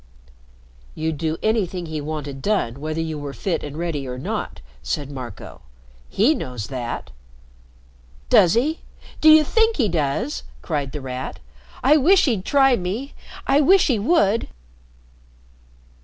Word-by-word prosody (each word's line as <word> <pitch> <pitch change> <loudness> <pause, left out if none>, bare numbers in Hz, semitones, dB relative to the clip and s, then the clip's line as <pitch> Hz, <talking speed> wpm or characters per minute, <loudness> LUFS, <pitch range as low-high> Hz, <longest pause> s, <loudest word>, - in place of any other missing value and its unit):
"You'd 160 -1 -3
do 160 -1 -1
anything 195 -5 0
he 155 -2 -4
wanted 145 -2 -5
done, 140 - -1
whether 155 +1 -3
you 160 -2 -3
were 145 -1 -6
fit 175 - -2
and 145 0 -7
ready 160 -5 -3
or 125 0 -5
not," 125 - -4 0.2
said 145 -1 -3
Marco. 125 -6 -9 0.5
"He 235 +10 +3
knows 125 - -5
that." 120 - -5 1.2
"Does 175 - +5
he? 295 +8 +1 0.4
Do 315 - +7
you 310 0 +8
think 450 +8 +2
he 245 -7 +2
does?" 170 - -1 0.2
cried 145 -5 -2
The 150 - -6
Rat. 130 0 -6 0.4
"I 295 +4 +6
wish 370 +7 +5
he'd 220 -9 0
try 270 -2 +4
me. 210 +9 -4 0.3
I 280 +2 +4
wish 370 +6 +5
he 245 -6 +1
would." 225 - +2
170 Hz, 140 wpm, -22 LUFS, -, 1.2 s, you